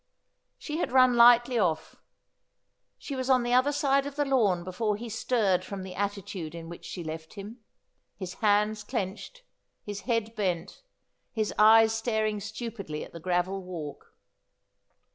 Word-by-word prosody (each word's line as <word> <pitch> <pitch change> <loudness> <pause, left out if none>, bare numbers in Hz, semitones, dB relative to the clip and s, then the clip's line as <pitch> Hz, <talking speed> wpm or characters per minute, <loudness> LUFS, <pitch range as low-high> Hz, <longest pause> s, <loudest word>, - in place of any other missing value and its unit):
She 305 0 -5
had 340 - -2
run 255 -1 +5
lightly 240 +1 +6
ofi^. 160 -6 -1 1.0
She 280 - -6
was 260 0 -3
on 255 -2 +4
the 240 0 -1
other 255 +3 +4
side 275 -1 +1
of 285 - -8
the 290 0 0
lawn 215 -10 +2
before 210 +4 -1
he 230 +3 -7
stirred 210 -4 +1
from 195 0 -6
the 185 -1 -8
attitude 195 -5 -4
in 165 0 -8
which 170 - -10
she 175 - -6
left 160 0 -7
him; 210 +4 -9 0.6
his 185 -2 -6
hands 210 0 +2
clenched, 220 - -5 0.4
his 205 -1 -5
head 230 -1 0
bent, 180 -6 -2 0.5
his 215 -2 -2
eyes 220 +1 +7
staring 220 -2 -1
stupidly 215 -6 -6
at - - -12
the 170 - -8
gravel 180 +3 -1
walk. 165 -6 -8
210 Hz, 155 wpm, -28 LUFS, 185-240 Hz, 1.0 s, eyes